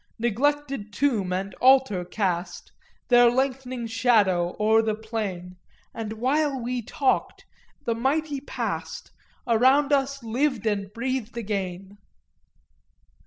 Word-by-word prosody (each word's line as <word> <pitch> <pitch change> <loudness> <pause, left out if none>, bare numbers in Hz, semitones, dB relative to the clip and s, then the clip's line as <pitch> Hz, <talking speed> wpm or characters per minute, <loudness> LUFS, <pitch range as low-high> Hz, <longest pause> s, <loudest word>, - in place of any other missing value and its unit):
Neglected 265 0 -1
tomb 210 -6 0
and 190 +1 -3
altar 260 -8 +4
cast 180 -1 -3 0.4
Their 245 -1 +7
lengthening 255 -1 -2
shadow 215 -7 +2
o'er 220 +1 +4
the 220 -1 -1
plain, 205 -5 -5 0.4
And 220 -1 -5
while 270 +4 0
we 245 +1 -3
talked 260 +4 -1 0.4
the 235 - +1
mighty 280 +5 -1
past 285 - -5 0.3
Around 260 +5 +4
us 275 -1 0
lived 245 0 -1
and 200 -2 -1
breathed 240 0 -3
again!" 195 -2 -4
230 Hz, 110 wpm, -25 LUFS, 205-265 Hz, 0.4 s, Their